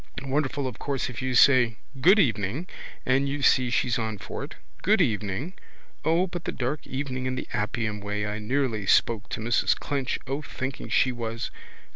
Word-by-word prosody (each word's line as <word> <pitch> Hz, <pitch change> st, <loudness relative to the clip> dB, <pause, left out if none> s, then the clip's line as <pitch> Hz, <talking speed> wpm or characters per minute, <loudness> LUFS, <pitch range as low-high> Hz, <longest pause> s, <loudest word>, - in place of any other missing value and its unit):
Wonderful 140 Hz, 0 st, -1 dB
of 125 Hz, -4 st, -5 dB
course 135 Hz, -3 st, -2 dB
if 125 Hz, -, -6 dB
you 130 Hz, -1 st, -1 dB
say: 125 Hz, -4 st, +6 dB, 0.3 s
good 185 Hz, +9 st, +7 dB
evening, 115 Hz, -, +1 dB, 0.4 s
and 135 Hz, +2 st, +2 dB
you 140 Hz, 0 st, -3 dB
see 130 Hz, -2 st, +4 dB
she's 120 Hz, 0 st, +1 dB
on 110 Hz, -2 st, -2 dB
for -, -, -6 dB
it: -, -, -8 dB, 0.3 s
good -, -, +4 dB
evening. 110 Hz, -, 0 dB, 0.5 s
O 165 Hz, +3 st, +3 dB
but 175 Hz, -2 st, -6 dB
the -, -, -1 dB
dark 135 Hz, +4 st, -3 dB
evening 130 Hz, -1 st, -3 dB
in 130 Hz, -, -1 dB
the -, -, -5 dB
Appian 110 Hz, 0 st, -1 dB
way 105 Hz, 0 st, -2 dB
I 105 Hz, +1 st, -3 dB
nearly 115 Hz, -3 st, -1 dB
spoke 115 Hz, -1 st, +3 dB
to -, -, -3 dB
Mrs 115 Hz, +2 st, +2 dB
Clinch 135 Hz, -3 st, -2 dB
O 135 Hz, +3 st, -2 dB
thinking 130 Hz, -2 st, -5 dB
she 130 Hz, -, +3 dB
was. 115 Hz, -1 st, -4 dB
130 Hz, 180 wpm, -26 LUFS, 110-140 Hz, 0.5 s, good